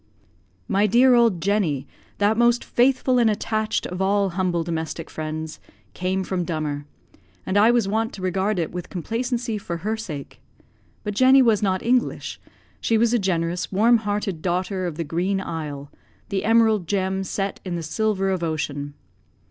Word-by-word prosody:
My 200 +1 +2
dear 250 +5 +5
old 230 -7 +4
Jenny, 190 -9 +1 0.3
that 205 +2 +3
most 240 +1 +3
faithful 255 0 +2
and 230 -2 +4
attached 215 0 -1
of 180 +1 -4
all 200 0 +2
humble 180 -2 0
domestic 165 0 -4
friends, 155 0 -5 0.3
came 185 +1 -1
from 185 -1 -2
Dummer, 150 -4 -3 0.6
and 190 - -2
I 210 +3 +6
was 240 -4 +3
wont 225 +3 0
to 190 - -8
regard 190 +3 0
it 165 -3 -1
with 180 -1 -6
complacency 230 - -2
for 170 -3 -4
her 220 +1 +1
sake. 160 -11 -7 0.6
But 210 - -3
Jenny 260 +4 +6
was 225 -4 +3
not 190 -2 0
English; 245 +1 0 0.4
she 225 - +1
was 230 +1 +3
a 240 - +3
generous, 175 -2 -1
warm 225 +5 +5
hearted 205 -5 -2
daughter 185 +1 -1
of 165 - -5
the 165 - -2
Green 180 +5 -1
Isle 150 -5 -5 0.4
the 195 -2 -1
Emerald 220 -5 +3
gem 190 0 0
set 195 +1 -3
in 180 -2 -4
the 170 - -4
silver 195 +3 0
of 185 -2 -1
ocean. 145 -3 -3
195 Hz, 165 wpm, -23 LUFS, 170-220 Hz, 0.6 s, I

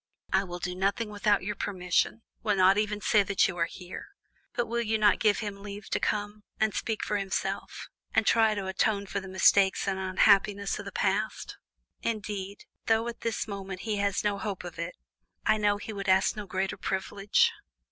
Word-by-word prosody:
I 190 +1 +4
will 175 -1 -6
do 180 0 -3
nothing 200 +4 0
without 205 -1 +2
your 210 +3 -2
permission; 190 +2 -1 0.2
will 210 -2 +1
not 190 0 +5
even 210 -1 -1
say 210 -1 +4
that 200 0 +2
you 185 - -4
are 170 -1 +1
here; 180 0 -9 0.5
but 240 - +1
will 235 +1 -1
you 220 -1 +1
not 210 -1 +4
give 210 -1 +3
him 200 -2 -5
leave 205 0 -8
to - - +1
come, 210 0 -2 0.2
and 220 -1 +2
speak 220 -2 -2
for 210 - 0
himself, 195 -1 -3 0.2
and 220 - +2
try 220 -1 +4
to 200 -2 -3
atone 200 +2 0
for 200 - -3
the 195 - -9
mistakes 190 +1 +4
and 190 -1 0
unhappiness 200 +1 +3
of - - -7
the - - -6
past? - - -1 0.4
Indeed, 205 -3 -4 0.2
though 225 +1 +3
at 235 0 -6
this 230 -1 -2
moment 195 -2 -6
he 215 -2 -2
has 200 -1 0
no 205 -1 0
hope 205 -4 -4
of 175 -1 -8
it, 170 +1 -4 0.5
I - - +4
know 205 -1 +2
that 205 - -10
he 220 - -6
would 200 -1 -4
ask 190 +1 +4
no 210 -2 -6
greater 190 +2 -2
privilege." 195 +1 +1
200 Hz, 200 wpm, -28 LUFS, 190-210 Hz, 0.5 s, not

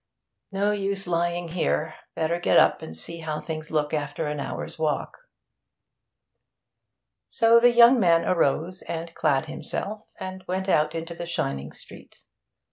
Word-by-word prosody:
No 200 +1 +1
use 195 -1 -1
lying 175 0 -1
here. 160 -2 -1 0.2
Better 165 +2 0
get - - +3
up - - +4
and 80 - -8
see 170 - -5
how 155 -1 -3
things 155 0 -6
look 150 -1 -1
after 150 +1 -2
an 150 0 -3
hour's 140 - -5
walk.' 160 - -2 2.0
So 230 0 +5
the 245 +1 +6
young 240 +1 +7
man 170 -4 +4
arose 170 +2 +1
and 165 0 -6
clad 135 -4 +1
himself, 210 +1 -5
and 185 0 -6
went 190 +1 -2
out 155 -3 +2
into 165 +1 -4
the 170 0 -7
shining 75 - -3
street. - - -12
170 Hz, 145 wpm, -25 LUFS, 155-190 Hz, 2.0 s, young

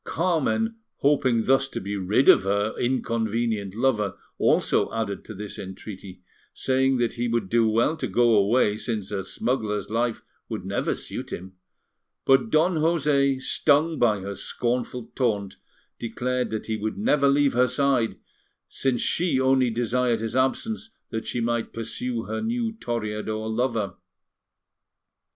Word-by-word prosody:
Carmen, 185 - 0 0.2
hoping 130 -5 +3
thus 135 +1 +3
to - - -5
be 100 +2 -4
rid 100 +7 +1
of - - +8
her 100 +2 0
inconvenient 115 -4 -1
lover, 105 -5 +1 0.2
also - - +2
added 110 -3 -3
to 110 - -8
this 105 +1 -7
entreaty, 95 -1 -9 0.3
saying 130 0 +2
that 120 -2 0
he 120 0 -2
would 115 -5 -1
do 115 0 +3
well 115 +8 +2
to 160 - -3
go 120 -1 +3
away, 105 +1 +3
since 110 -3 -3
a 100 -2 -2
smuggler's 105 0 -2
life 115 0 -1 0.3
would - - -5
never - - -1
suit - - -6
him; 95 +1 -7 0.7
but 135 +11 +4
Don 165 0 +3
José, 145 -4 +2
stung 155 +4 +2
by 110 -5 +3
her 100 +1 -5
scornful 120 +2 -3
taunt, 105 -6 -1 0.4
declared 125 +2 -2
that 110 - -4
he 110 -1 -2
would 110 +1 -3
never 150 -9 +3
leave 140 0 +3
her 125 +1 +4
side, 125 -2 +1 0.5
since 130 -3 -1
she 165 -6 +2
only 130 -1 +3
desired 120 0 0
his 115 +1 -4
absence 220 - 0 0.2
that 110 - -4
she 120 - -2
might 120 0 -1
pursue 115 +1 -3
her 110 0 -4
new 230 0 -1
Toreador 110 - -3
lover. 110 -4 -1
120 Hz, 145 wpm, -25 LUFS, 110-135 Hz, 0.7 s, of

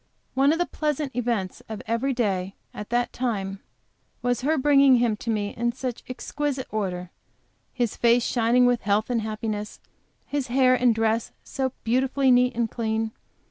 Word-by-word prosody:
One 275 +2 +4
of 325 - +1
the 350 - +1
pleasant 300 -5 -2
events 230 -6 -2
of 220 -2 -6
every 230 +4 0
day 195 -6 -1 0.2
at 210 - -7
that 240 0 0
time, 200 -6 -2 0.6
was 245 0 0
her 310 +4 +1
bringing 275 -1 +5
him 235 -3 +2
to 230 - -6
me 210 -2 0
in 235 0 0
such 250 -1 -4
exquisite 275 +1 -3
order, 180 -4 -3 0.6
his 240 -4 -1
face 235 0 +3
shining 240 +1 +3
with 245 -1 +2
health 210 +3 +1
and 235 -2 +1
happiness, 215 -1 -4 0.5
his 285 -2 -2
hair 255 +1 +4
and 250 -2 +3
dress 225 0 0
so 265 -1 -3
beautifully 260 +3 +2
neat 250 0 +4
and 230 -2 0
clean. 220 -1 -1
240 Hz, 165 wpm, -25 LUFS, 220-260 Hz, 0.6 s, bringing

